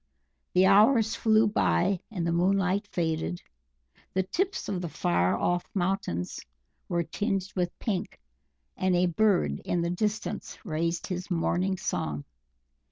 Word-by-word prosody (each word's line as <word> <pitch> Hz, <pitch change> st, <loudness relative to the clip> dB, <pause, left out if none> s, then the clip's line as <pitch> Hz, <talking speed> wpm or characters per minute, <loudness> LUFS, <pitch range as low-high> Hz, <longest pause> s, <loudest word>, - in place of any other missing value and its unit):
The 185 Hz, +1 st, +5 dB
hours 220 Hz, +3 st, +5 dB
flew 220 Hz, 0 st, +4 dB
by 135 Hz, -, +2 dB
and 180 Hz, -6 st, -3 dB
the 170 Hz, -, +1 dB
moonlight 190 Hz, +3 st, +2 dB
faded; 165 Hz, -1 st, -2 dB, 0.7 s
the 190 Hz, -, +3 dB
tips 380 Hz, -, -2 dB
of 185 Hz, -3 st, -2 dB
the 170 Hz, -, -4 dB
far 90 Hz, -, +1 dB
off 175 Hz, +8 st, 0 dB
mountains 175 Hz, -, -1 dB, 0.5 s
were 170 Hz, -1 st, +1 dB
tinged 195 Hz, +3 st, -2 dB
with 175 Hz, -2 st, -1 dB
pink, 195 Hz, -5 st, -3 dB, 0.6 s
and 185 Hz, -1 st, +1 dB
a 175 Hz, +1 st, +3 dB
Bird 170 Hz, -, +2 dB
in 175 Hz, -1 st, -1 dB
the 170 Hz, -, -1 dB
distance 210 Hz, +4 st, -2 dB
raised 165 Hz, 0 st, -1 dB
his 180 Hz, +1 st, -4 dB
morning 185 Hz, +2 st, 0 dB
song. 75 Hz, -, -2 dB
180 Hz, 135 wpm, -28 LUFS, 170-200 Hz, 0.7 s, The